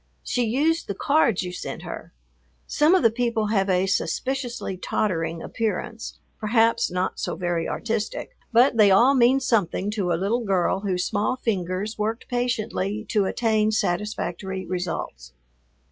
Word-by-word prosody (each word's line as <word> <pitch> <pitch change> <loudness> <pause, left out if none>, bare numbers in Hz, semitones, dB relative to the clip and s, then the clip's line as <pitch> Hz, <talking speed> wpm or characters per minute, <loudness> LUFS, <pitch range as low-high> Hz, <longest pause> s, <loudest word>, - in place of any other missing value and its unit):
She 245 - 0
used 300 +9 +1
the 200 - -3
cards 235 - +2
you 180 0 -5
sent - - -6
her. - - -8 0.5
Some 310 +5 +3
of 370 - +2
the 230 - +5
people 230 -2 0
have 195 -2 +1
a 185 0 +2
suspiciously 245 +3 -2
tottering 165 -4 -2
appearance, 225 0 -3 0.2
perhaps 225 +2 +2
not 180 +1 -2
so - - -2
very 175 -2 -2
artistic, 225 - -3 0.2
but 245 +1 +4
they 210 -2 +7
all 235 +8 +6
mean 260 0 +4
something 205 -5 0
to 200 -5 -1
a 165 - +2
little 215 +7 0
girl 190 -2 +1
whose 185 -3 -1
small 215 +3 0
fingers 200 -2 -2
worked 220 +3 -2
patiently 225 -4 -2
to 205 -2 +2
attain 220 0 +1
satisfactory 190 -2 -2
results. 165 - -4
210 Hz, 145 wpm, -24 LUFS, 185-235 Hz, 0.5 s, they